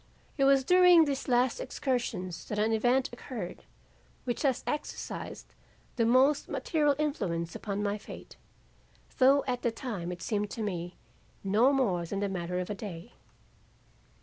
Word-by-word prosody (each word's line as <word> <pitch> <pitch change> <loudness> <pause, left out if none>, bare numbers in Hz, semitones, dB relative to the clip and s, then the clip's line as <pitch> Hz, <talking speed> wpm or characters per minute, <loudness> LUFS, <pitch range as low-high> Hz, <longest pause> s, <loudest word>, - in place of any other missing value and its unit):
It 275 - +2
was 275 -1 +5
during 360 +1 +6
these 275 -2 -3
last 250 - +2
excursions 240 - -3
that 210 - -4
an 215 +2 +2
event 245 +4 +2
occurred - - -7 0.6
which 240 -2 -3
has 270 -4 +1
exercised 295 0 -5 0.4
the 230 -3 +2
most 265 +4 +3
material 295 -4 +1
influence 170 - -2
upon 205 -1 -3
my 205 +1 -1
fate, - - -11 0.8
though 275 +2 +5
at 250 -2 -2
the 235 - +1
time 225 -7 -5
it 175 - -7
seemed 210 -1 -1
to 225 - -5
me 175 -3 -4 0.5
no 215 +7 +4
more 215 -11 +1
than 195 - -3
the 200 0 -1
matter 180 -1 -3
of 180 +3 -3
a - - -1
day. 195 0 -8
235 Hz, 150 wpm, -30 LUFS, 195-270 Hz, 0.8 s, during